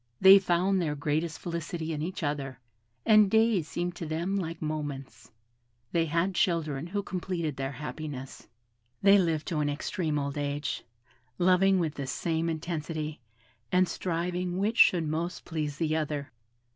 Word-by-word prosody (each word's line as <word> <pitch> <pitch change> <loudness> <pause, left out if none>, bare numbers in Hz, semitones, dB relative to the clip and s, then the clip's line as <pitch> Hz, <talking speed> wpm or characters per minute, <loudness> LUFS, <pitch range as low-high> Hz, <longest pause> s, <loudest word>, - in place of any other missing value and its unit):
They 190 +1 +9
found 185 +1 +2
their 150 -3 -1
greatest 155 +3 -1
felicity 165 -1 -4
in 150 - -3
each 180 +3 -4
other: 140 -4 -3 0.5
and 215 -2 +6
days 220 -6 +3
seemed 175 +1 -3
to 165 - -5
them 170 +5 -1
like 165 -4 -3
moments. 145 -7 -5 0.6
They 165 -1 +1
had 170 +5 +1
children 165 -5 0
who 200 +3 -2
completed 175 -5 -3
their 135 +1 -3
happiness. 145 -1 -7 0.6
They 200 0 +7
lived 165 -4 0
to 165 -4 -1
an 145 -1 +1
extreme 150 +2 -2
old 140 0 -2
age; 145 -1 -2 0.5
loving 185 +2 +4
with 165 -4 0
the 140 -3 -5
same 160 +5 -1
intensity, 160 -1 -4 0.5
and 180 0 +4
striving 180 +1 -2
which 210 +4 0
should 170 -4 +5
most 165 +3 -3
please 150 -3 -3
the 155 -1 0
other. 150 -2 -2
165 Hz, 150 wpm, -29 LUFS, 150-180 Hz, 0.6 s, They